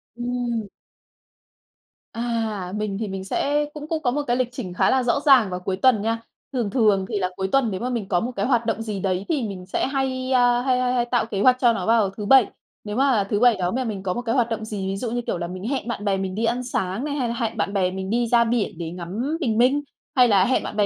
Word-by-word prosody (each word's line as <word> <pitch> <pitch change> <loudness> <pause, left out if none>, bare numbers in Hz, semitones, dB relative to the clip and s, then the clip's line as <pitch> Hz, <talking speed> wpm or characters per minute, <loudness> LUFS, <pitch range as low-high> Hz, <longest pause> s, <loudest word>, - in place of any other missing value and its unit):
Ừm. 240 -2 -2 1.5
À, 225 -5 -3
mình 210 -2 -2
thì 220 - -2
mình 190 -1 -5
sẽ 290 +9 0
cũng 300 0 -8
cũng 320 -1 -2
có 245 - +2
một 295 +4 -1
cái 240 - +2
lịch 255 -2 0
trình 240 -8 -6
khá - - +2
là 260 -1 +2
rõ 245 +3 +1
ràng 260 -8 +6
vào 180 0 -4
cuối 185 +1 -3
tuần 240 -1 +4
nha. 225 +2 -1 0.3
Thường 240 -5 -1
thường 210 -5 +2
thì 210 -3 -1
là 185 -1 0
cuối 190 0 -2
tuần 270 -5 +2
nếu 190 - -3
mà 250 - -2
mình 230 -6 -3
có 180 -2 +2
một 240 +6 -3
cái 200 - -1
hoạt 240 -2 +2
động 225 -1 -1
gì 215 -3 -4
đấy 185 0 -1
thì 295 -6 0
mình 185 -3 -7
sẽ 185 - -1
hay, 265 -1 -2
à, 245 -1 +4
hay 255 0 +1
hay 250 0 +1
hay 240 -1 +1
tạo 240 -1 0
kế 205 -3 -3
hoạch 255 +3 +5
cho 240 -3 +4
nó 225 - -3
vào 225 -3 +3
thứ 205 +2 -7
Bảy. 260 0 +6 0.4
Nếu 210 0 -5
mà 260 -5 +3
thứ 205 - +1
Bảy 245 -1 +5
đó 180 -1 -1
mà 260 +4 -1
mình 210 -5 -4
có 185 -2 -1
một 240 - -3
cái 230 0 -1
hoạt 240 -3 +2
động 220 -1 -3
gì, 205 -3 -4
ví 195 - -2
dụ 230 +2 -3
như, 245 +1 -1
kiểu - - -1
là, 170 0 -4
mình 185 +1 -7
hẹn 265 -2 -2
bạn 235 -3 -4
bè 195 -1 +1
mình 190 -1 -3
đi 225 +2 0
ăn 245 +2 0
sáng 195 -3 -2
này, 290 -1 -2
hay 260 -4 -1
là 235 - -2
hẹn 225 -1 -2
bạn 200 -1 -1
bè 185 -2 +1
mình 190 0 -5
đi 235 +2 +1
ra 235 0 +4
biển 230 -6 -1
để 165 -1 -5
ngắm 200 - -3
bình 230 -9 0
minh, 260 +5 +3 0.3
hay 250 -2 +6
là 195 -4 +4
hẹn 255 - +1
bạn - - -6
bè 205 - +4
230 Hz, 280 wpm, -23 LUFS, 195-250 Hz, 1.5 s, ràng